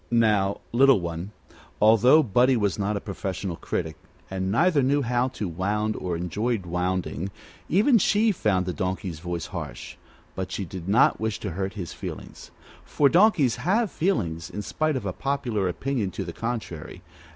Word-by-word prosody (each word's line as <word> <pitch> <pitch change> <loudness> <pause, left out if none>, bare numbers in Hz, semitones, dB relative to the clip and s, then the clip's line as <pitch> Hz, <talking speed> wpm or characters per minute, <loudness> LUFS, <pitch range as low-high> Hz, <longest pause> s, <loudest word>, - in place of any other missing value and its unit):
Now, 105 -4 +2
Little 135 0 +5
One, 85 +2 -5 0.5
although 115 +8 +6
Buddie 125 +2 +3
was 105 -3 0
not 100 +1 0
a - - -2
professional 95 -2 -4
critic, 80 0 -3 0.4
and 95 0 -2
neither 160 - +3
knew 140 +2 +2
how 120 +1 +1
to 120 -6 -4
wound 105 +5 -1
nor 90 -2 -2
enjoyed 100 +5 -2
wounding, 90 0 -2 0.4
even 225 - +4
she 215 +3 +3
found 100 - +1
the 90 - -2
Donkey's 90 -1 -3
voice 85 -1 -4
harsh; 80 -10 -7 0.4
but 95 0 -5
she 100 - -3
did 90 +1 -7
not 115 +6 +4
wish 110 -1 -2
to 100 - -3
hurt 95 +3 -3
his 90 -5 -6
feelings - - -8 0.3
for 145 -2 +2
donkeys 170 - +4
have 205 +5 +1
feelings, 85 - -1
in 105 - -5
spite 155 +5 -1
of 125 -6 -3
a 95 - -2
popular 125 -8 -1
opinion 120 +1 -2
to 95 - -5
the 85 - -6
contrary. 110 -8 -5
105 Hz, 165 wpm, -25 LUFS, 90-130 Hz, 0.5 s, although